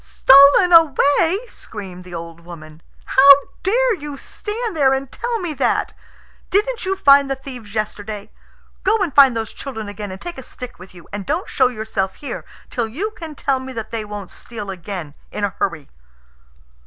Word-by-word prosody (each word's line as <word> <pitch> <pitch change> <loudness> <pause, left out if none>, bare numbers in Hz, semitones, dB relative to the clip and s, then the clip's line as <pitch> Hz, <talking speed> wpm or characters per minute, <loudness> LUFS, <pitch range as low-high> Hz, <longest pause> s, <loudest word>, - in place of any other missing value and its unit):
"Stolen 280 +7 +6
away!" 330 - +4
screamed 190 - -10
the 180 -1 -9
old 165 0 -8
woman. 165 -2 -12 0.2
"How 275 +1 +7 0.3
dare 485 +5 +2
you 295 -6 -7
stand 430 - -5
there 270 -3 +4
and 265 -1 -5
tell 475 -1 -3
me 350 -4 -3
that? - - 0 0.6
Didn't 425 +2 0
you 385 - +1
find 280 -6 +5
the 270 - 0
thieves 250 -6 -10
yesterday? 210 -1 -4 0.5
Go 445 - +3
and 375 -9 -1
find 270 -4 +6
those 225 -1 -4
children 225 -6 -7
again, 205 -1 -6
and 190 - -8
take 345 0 -7
a - - -6
stick 250 -3 -10
with 185 0 -13
you, 175 - -14
and 205 -2 -5
don't 365 - -1
show 260 - +3
yourself 215 -5 -3
here 285 - -6 0.3
till 235 -3 -1
you 355 - -4
can 325 -7 -9
tell 275 -2 0
me 260 0 -8
that 225 -2 -6
they 225 -2 -3
won't 205 -2 -8
steal 210 -4 -7
again 175 -4 -7 0.2
in 210 - -5
a 200 - 0
hurry." 160 -7 -3
255 Hz, 180 wpm, -20 LUFS, 205-315 Hz, 0.6 s, How